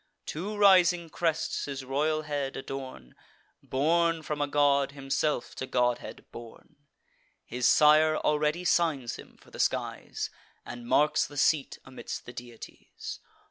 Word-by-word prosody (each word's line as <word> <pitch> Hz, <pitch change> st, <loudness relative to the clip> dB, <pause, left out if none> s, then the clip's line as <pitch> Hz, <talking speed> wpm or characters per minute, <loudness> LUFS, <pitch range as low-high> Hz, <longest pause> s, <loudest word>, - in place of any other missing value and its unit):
Two 200 Hz, +7 st, -5 dB
rising 180 Hz, -4 st, +5 dB
crests, 165 Hz, -2 st, -1 dB
his 135 Hz, -2 st, -6 dB
royal 155 Hz, +4 st, 0 dB
head 145 Hz, -2 st, -3 dB
adorn; 130 Hz, -, -7 dB, 0.5 s
Born 165 Hz, +4 st, +1 dB
from 150 Hz, 0 st, -3 dB
a 145 Hz, -, +1 dB
god, 140 Hz, -1 st, +2 dB
himself 140 Hz, 0 st, -1 dB
to 130 Hz, -, -4 dB
godhead 125 Hz, -1 st, -1 dB
born: 115 Hz, +6 st, -12 dB, 0.7 s
His 125 Hz, +1 st, 0 dB
sire 155 Hz, +1 st, +5 dB
already 150 Hz, +4 st, 0 dB
signs 155 Hz, -10 st, +1 dB
him -, -, -14 dB
for -, -, -21 dB
the -, -, -11 dB
skies, -, -, -2 dB, 0.3 s
And 120 Hz, -1 st, -8 dB
marks 150 Hz, +4 st, +3 dB
the 145 Hz, -, -12 dB
seat 145 Hz, 0 st, +2 dB
amidst 135 Hz, -1 st, -7 dB
the 120 Hz, -, -9 dB
deities. 120 Hz, -2 st, -9 dB
145 Hz, 135 wpm, -28 LUFS, 130-155 Hz, 0.7 s, rising